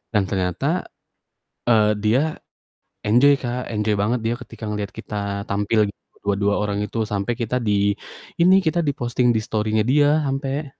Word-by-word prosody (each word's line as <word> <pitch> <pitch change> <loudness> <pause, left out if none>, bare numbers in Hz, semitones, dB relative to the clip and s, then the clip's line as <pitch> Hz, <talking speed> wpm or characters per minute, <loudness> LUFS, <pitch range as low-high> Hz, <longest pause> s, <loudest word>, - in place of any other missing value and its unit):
dan 105 - +4
ternyata, 90 -3 -1 0.8
eee, 105 -2 +4
dia 110 +6 +3 0.9
enjoy, 125 +7 +6
Kak, 125 0 -3
enjoy 105 0 0
banget 115 +5 0
dia 115 - +1
ketika 110 - -10
ngeliat 105 -1 -3
kita 105 - -7 0.3
tampil 105 +1 +1 0.4
dua 100 -1 +1
dua 100 0 +1
orang 100 -1 -1
itu 110 +2 -2
sampai 100 +1 -1
kita 115 +2 -2
di 100 -1 +2 0.4
ini, 185 +3 +6
kita 170 -1 0
di-posting 120 -3 +1
di - - +2
story-nya 110 0 0
dia 145 +2 +4
ampe. 135 +2 -2
110 Hz, 150 wpm, -22 LUFS, 105-130 Hz, 0.9 s, enjoy